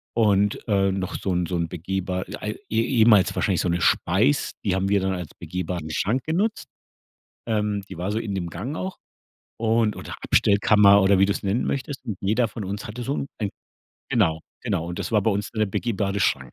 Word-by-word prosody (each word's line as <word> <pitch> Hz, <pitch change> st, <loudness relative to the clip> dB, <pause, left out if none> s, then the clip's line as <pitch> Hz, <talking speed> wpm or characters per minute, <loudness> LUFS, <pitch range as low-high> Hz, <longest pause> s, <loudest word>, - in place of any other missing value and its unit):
und, 105 Hz, -3 st, +2 dB
äh, 100 Hz, -1 st, +3 dB
noch 95 Hz, 0 st, -3 dB
so 95 Hz, -, -2 dB
'n 90 Hz, 0 st, +1 dB
so 90 Hz, -, -2 dB
'n 85 Hz, -1 st, -1 dB
begehbar 90 Hz, +2 st, -3 dB
äh, -, -, -5 dB
ei 105 Hz, -, -3 dB, 0.2 s
e 110 Hz, +1 st, +2 dB
ehemals 110 Hz, -6 st, +4 dB
wahrscheinlich -, -, +1 dB
so -, -, -1 dB
'ne 85 Hz, 0 st, 0 dB
Speis, 75 Hz, -3 st, +2 dB
die 95 Hz, -, +1 dB
haben 95 Hz, +1 st, 0 dB
wir 100 Hz, -1 st, +3 dB
dann 95 Hz, 0 st, 0 dB
als 90 Hz, -4 st, -5 dB
begehbaren 90 Hz, -3 st, -4 dB
Schrank 115 Hz, -, 0 dB
genutzt. 195 Hz, +8 st, -1 dB, 0.8 s
Ähm, 105 Hz, -2 st, 0 dB
die 95 Hz, -, -9 dB
war 95 Hz, +3 st, -2 dB
so 110 Hz, -, -1 dB
in 105 Hz, -3 st, -4 dB
dem 90 Hz, -3 st, -3 dB
Gang 115 Hz, -, -5 dB
auch 190 Hz, +2 st, -4 dB, 0.6 s
und 115 Hz, -1 st, +2 dB
oder -, -, -7 dB
Abstellkammer 100 Hz, 0 st, +5 dB
oder 95 Hz, 0 st, +4 dB
wie 95 Hz, -, +6 dB
du's 100 Hz, -, -1 dB
nennen 100 Hz, +5 st, 0 dB
möchtest. 135 Hz, 0 st, -3 dB
Und 110 Hz, -6 st, -4 dB
jeder 110 Hz, +4 st, +1 dB
von 105 Hz, -1 st, -6 dB
uns 100 Hz, +2 st, -5 dB
hatte 115 Hz, +4 st, -6 dB
so 140 Hz, -, -1 dB
'n 140 Hz, -, -2 dB
ein 105 Hz, -3 st, -1 dB, 0.6 s
genau, 80 Hz, -8 st, +2 dB, 0.2 s
genau. 85 Hz, -, -1 dB
Und 85 Hz, 0 st, -5 dB
das -, -, -4 dB
war 105 Hz, -, +4 dB
bei 110 Hz, -, +2 dB
uns 100 Hz, +1 st, -2 dB
dann 110 Hz, -, -8 dB
der 110 Hz, -, +3 dB
begehbare 100 Hz, -1 st, -1 dB
Schrank. 65 Hz, -8 st, 0 dB
100 Hz, 215 wpm, -24 LUFS, 95-110 Hz, 0.8 s, wie